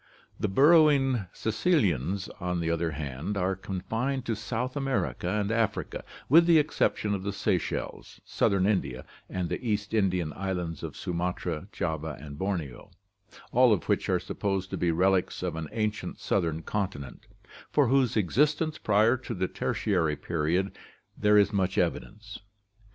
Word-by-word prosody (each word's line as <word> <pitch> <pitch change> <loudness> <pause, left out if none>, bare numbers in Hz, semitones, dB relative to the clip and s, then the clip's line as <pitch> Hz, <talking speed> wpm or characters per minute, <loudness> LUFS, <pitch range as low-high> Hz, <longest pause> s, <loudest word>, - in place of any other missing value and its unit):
The - - 0
burrowing 135 - +4
caecilians, 100 - 0
on 90 -1 -2
the 85 0 0
other 85 0 0
hand, 75 +6 -4
are 95 0 0
confined 110 +8 -3
to 115 - -1
South 120 +5 -3
America 130 -10 -1
and 105 +1 0
Africa, 115 -3 -1 0.2
with 165 +5 +6
the 170 -2 +7
ex 150 0 0
ception 105 -1 +1
of 100 - -2
the 100 +1 -2
Seychelles, 95 -2 -3
southern 95 -2 +1
India, 65 -11 -1 0.2
and 90 -2 -2
the - - -4
East 105 -2 -2
Indian 90 -7 +1
islands 90 -5 -3
of - - -6
Sumatra, 90 -1 -3
Java, 80 -3 -3
and 70 0 -9
Borneo, 85 -10 -3 0.6
all 125 0 +5
of 100 -7 +1
which - - 0
are - - +2
supposed 95 -1 -3
to - - -2
be 90 - +1
relics 90 +2 +1
of - - -2
an 80 -2 -5
ancient 110 -1 -3
southern 80 -4 -1
continent, 95 -10 -4 0.4
for 145 -3 +3
whose 130 -3 +2
existence 150 - +1
prior 110 +4 +3
to 120 -2 -6
the 95 0 -1
Tertiary 85 -8 0
period 85 +5 -1 0.4
there 105 0 +4
is 100 +1 +4
much 95 -1 0
evidence. 105 +5 -2
95 Hz, 150 wpm, -28 LUFS, 85-115 Hz, 0.6 s, the